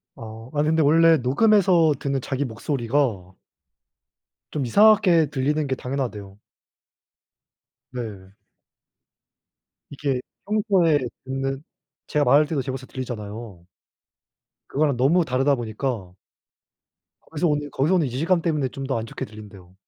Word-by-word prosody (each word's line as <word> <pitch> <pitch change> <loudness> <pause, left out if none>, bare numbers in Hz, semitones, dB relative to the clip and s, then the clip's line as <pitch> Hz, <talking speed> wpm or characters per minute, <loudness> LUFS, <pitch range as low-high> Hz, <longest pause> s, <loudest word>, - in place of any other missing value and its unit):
아. 110 +1 -10
아니 150 0 0
근데 160 0 +3
원래 165 +2 +5
녹음해서 170 - +3
듣는 140 -2 -2
자기 135 +2 -3
목소리가 115 - -2 1.2
좀 140 -4 -2
이상하게 185 - +5
들리는 150 +2 0
게 135 - -1
당연하대요. 120 -7 -5 1.6
네. 100 -6 -7 1.6
이게 140 -2 -2 0.3
평소에 195 -7 +2 0.3
듣는 135 +1 -3 0.4
제가 150 -1 +1
말할 150 +2 +5
때도 145 -3 -2
제 130 - -5
목소리가 130 0 -7
들리잖아요. 110 -6 -7 1.1
그거랑 145 -1 +1
너무 160 +8 +3
다르다 135 +1 +1
보니까 115 -5 -4 1.2
거기서 160 +2 0
오는 145 -1 -1
거기서 145 +8 +1
오는 170 -5 +2
이질감 165 +8 0
때문에 150 -6 0
좀 135 +2 -7
더 130 -4 -1
안 110 - -5
좋게 - - -6
들린대요. 100 -4 -13
135 Hz, 280 characters per minute, -23 LUFS, 120-155 Hz, 1.6 s, 원래